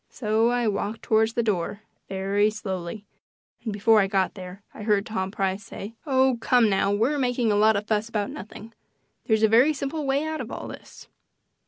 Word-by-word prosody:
So 220 0 +1
I 245 -1 +1
walked 210 +1 -2
toward 220 0 +3
the 235 - +1
door 205 -1 -2 0.3
very 195 +2 +1
slowly, 200 -1 -5 0.6
and 220 - -3
before 215 +2 +4
I 195 - +1
got 190 -1 0
there 185 +1 -10
I - - -10
heard 205 -1 +1
Tom 190 -4 -3
Price 195 0 -2
say: 200 +2 -8
"Oh, 260 -2 +3
come 240 -4 +4
now; 195 +1 +2
we're 235 +9 +1
making 245 -3 +1
a - - +2
lot 215 +1 +4
of 200 +1 -2
fuss 215 +1 -1
about 210 -3 -2
nothing. 215 +3 -10 0.5
There's 220 -2 +2
a - - +7
very 245 +8 +5
simple 290 +2 -4
way 275 +2 +1
out 315 0 -3
of - - -7
all - - -6
this. - - -12
215 Hz, 195 wpm, -25 LUFS, 200-235 Hz, 0.6 s, a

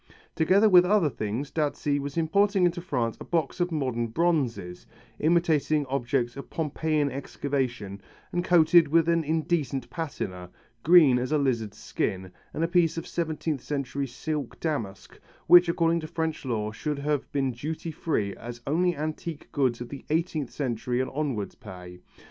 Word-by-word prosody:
Together 190 +7 +4
with 180 -3 +7
other 180 -5 +3
things, 115 +7 -4
Dazzi 145 -2 0
was 140 +2 -5
importing 195 +3 +3
into 175 0 0
France 125 -10 -2
a - - -7
box 165 -1 -1
of 175 0 0
modern 130 -6 -1
bronzes, 120 - -1 0.3
imitating 155 -2 +2
objects 125 -2 -1
of 140 - -8
Pompeiian 155 -2 -1
excavation 130 -7 -3 0.3
and 175 0 -1
coated 170 -2 +5
with 165 +2 +3
an 170 -1 +2
indecent 155 -4 -1
patina, 95 - -5 0.3
green 155 -6 +6
as 125 +3 -3
a 155 - +3
lizard's 120 -7 -1
skin, 95 -1 -3 0.2
and 160 - -2
a - - +2
piece 170 -2 +2
of 165 - -4
seventeenth 160 -4 -2
century 140 0 -3
silk 140 +2 -5
damask, 115 -12 -4 0.3
which 175 0 +7
according 170 0 +2
to 155 - -6
French 160 -2 -3
law 110 -4 -2
should 150 +6 -3
have 145 0 -2
been 135 -2 0
duty 155 +7 -5
free 130 -11 -2
as 120 0 -8
only 175 +3 +1
antique 155 +1 -5
goods 130 -4 0
of 120 - -6
the 140 - -8
eighteenth 155 -4 -1
century 125 -2 -2
and 130 - -1
onwards 135 -8 -2
pay. 90 -1 -11
145 Hz, 160 wpm, -27 LUFS, 125-165 Hz, 0.3 s, with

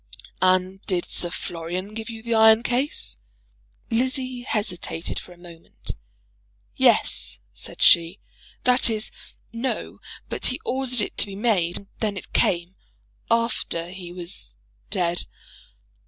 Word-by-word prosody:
"And 185 +1 +2
did 180 -3 +1
Sir 175 - -1
Florian 175 +4 -4
give 220 0 -5
you 225 -1 -7
the 235 0 -1
iron 220 0 +7
case?" 250 - 0 0.7
Lizzie 255 +1 0
hesitated 195 -8 -1
for - - -13
a 175 - -13
moment. 170 -1 -8 0.8
"Yes," - - +3 0.2
said - - -4
she. 170 +3 +6 0.4
"That 250 0 +4
is, 220 0 -1 0.4
no. 235 +3 -3 0.3
But - - 0
he 255 - -1
ordered 255 -2 +1
it - - -3
to - - +4
be 195 - -7
made; 195 -6 +1
and 200 - -11
then 210 -3 0
it - - -7
came, 175 +1 +2 0.5
after 230 -7 0
he 180 -2 -8
was 175 - -6 0.3
dead." 175 0 +1
200 Hz, 130 wpm, -24 LUFS, 175-230 Hz, 0.8 s, iron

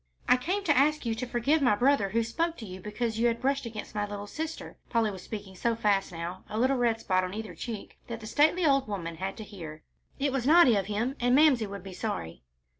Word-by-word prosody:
"I - - +7
came 365 +11 -1
to 295 -6 +3
ask 295 +2 +3
you 230 - 0
to 245 +3 -4
forgive 260 +6 +1
my 245 -6 +4
brother 245 -3 +3
who 230 +3 +1
spoke 330 +9 -1
to 225 - -7
you 185 -1 -8
because 220 +2 -3
you 235 0 +4
brushed 270 +1 -1
against 215 -2 -7
my 210 - -1
little 205 0 -5
sister." 320 +9 -6
Polly 230 -3 +2
was 190 -2 -8
speaking 200 -1 -7
so 230 +5 0
fast 205 -4 +1
now, 170 +2 -6
a 215 - -4
little 260 +3 +2
red 235 -2 +1
spot 185 -4 +1
on 185 +2 -4
either 220 0 -5
cheek, 225 -4 -7
that 230 -1 -5
the 220 - -10
stately 310 +9 +3
old 275 -4 +3
woman 170 -5 -4
had 190 +2 -4
to 220 - -6
hear. 165 -7 -9 0.3
"It 280 0 0
was 260 -1 -1
naughty 310 -7 +7
of 195 -2 0
him, 225 +6 -1
and 245 +1 +3
Mamsie 275 -7 +5
would 200 -2 -7
be 195 -1 -8
sorry." 85 - -4
225 Hz, 240 wpm, -29 LUFS, 200-270 Hz, 0.3 s, I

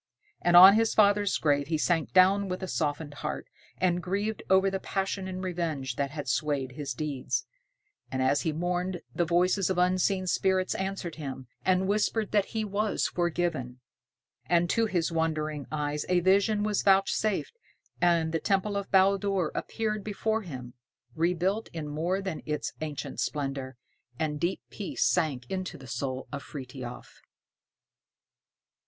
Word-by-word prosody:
And 175 0 +5
on 190 +2 +11
his 225 +1 +2
father's 205 -1 +4
grave 145 -2 +1
he 160 0 0
sank 165 0 +1
down 195 +2 +5
with 185 +1 -4
a - - -2
softened 150 -2 -2
heart, 150 +1 -4 0.3
and 180 -1 +1
grieved 200 +4 -2
over 190 +1 +4
the 195 - -2
passion 195 0 -2
and 185 0 -5
revenge 160 -8 -2
that 140 +1 -1
had 145 0 -6
swayed 140 -1 0
his 140 -1 -5
deeds. 145 -2 -2 0.7
And 130 - -2
as 130 +2 +2
he 160 - 0
mourned, 180 +2 -2
the 175 - +1
voices 180 +3 +2
of 190 - 0
unseen 185 +1 +2
spirits 185 +1 +1
answered 190 -3 -4
him, 135 -4 -6 0.2
and 185 0 +2
whispered 215 +1 0
that 205 -2 +3
he 220 -1 -3
was 210 +1 0
forgiven. 170 -8 -1 0.7
And 175 0 +3
to 230 -1 +2
his 175 -5 0
wondering 155 -3 -1
eyes 150 0 -2
a 180 -1 +4
vision 200 +4 +3
was 210 -1 +1
vouchsafed, 195 - +2 0.5
and 170 -2 +3
the 165 - 0
temple 200 +1 0
of 200 -1 -4
Baldur 195 -2 +3
appeared 215 -2 -2
before 220 +2 -1
him, 130 - -8 0.4
rebuilt 180 +6 0
in 160 -3 -4
more 170 +6 -1
than 190 -5 -4
its 150 0 -2
ancient 150 -2 -5
splendor, 135 -3 -3 0.4
and 150 -1 -2
deep 175 +4 -1
peace 205 - -2
sank 150 -8 +1
into 185 -3 -3
the 135 - -12
soul 130 +2 -4
of 140 -1 -4
Frithiof. 130 -3 -9
175 Hz, 155 wpm, -28 LUFS, 150-195 Hz, 0.7 s, on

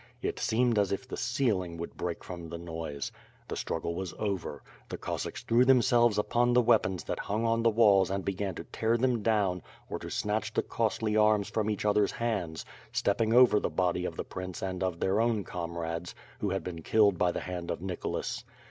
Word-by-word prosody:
It - - -2
seemed 115 0 +2
as 100 -2 +1
if 100 +7 -3
the - - -5
ceiling 105 -9 0
would 85 0 -6
break 85 -1 -4
from 85 -2 -7
the 85 - -5
noise. 80 -4 -5 0.4
The - - -4
struggle 85 +1 -2
was 95 0 -5
over; 100 -5 -3 0.3
the - - -4
Cossacks - - -4
threw 120 +2 +4
themselves 120 -3 +4
upon 120 +3 +2
the 125 - +6
weapons 95 - +2
that - - -4
hung 110 +3 -1
on 115 0 +2
the 115 - +4
walls 105 -4 +5
and 95 0 -2
began 100 -1 -2
to - - -6
tear 115 +1 0
them 125 -2 +1
down, 100 -5 +1 0.3
or - - -2
to - - -7
snatch 105 +1 -1
the - - +2
costly 110 -1 -1
arms 105 -1 +3
from 110 -1 0
each 105 -1 -2
other's 105 -1 +3
hands, 100 -9 -2 0.3
stepping 110 +2 +1
over 120 -3 +6
the - - -1
body 90 -1 0
of - - -4
the - - -3
prince 90 0 -6
and 95 -1 -3
of 90 -3 -1
their 100 +3 +2
own 115 -3 +1
com 85 -2 -5
rades, 85 +1 -4 0.2
who 105 - -1
had 95 0 -2
been 85 -2 -6
killed 100 +1 +3
by 90 - +3
the - - -4
hand 90 -2 -5
of - - -2
Nicholas. 90 0 -3
100 Hz, 210 wpm, -30 LUFS, 90-115 Hz, 0.4 s, the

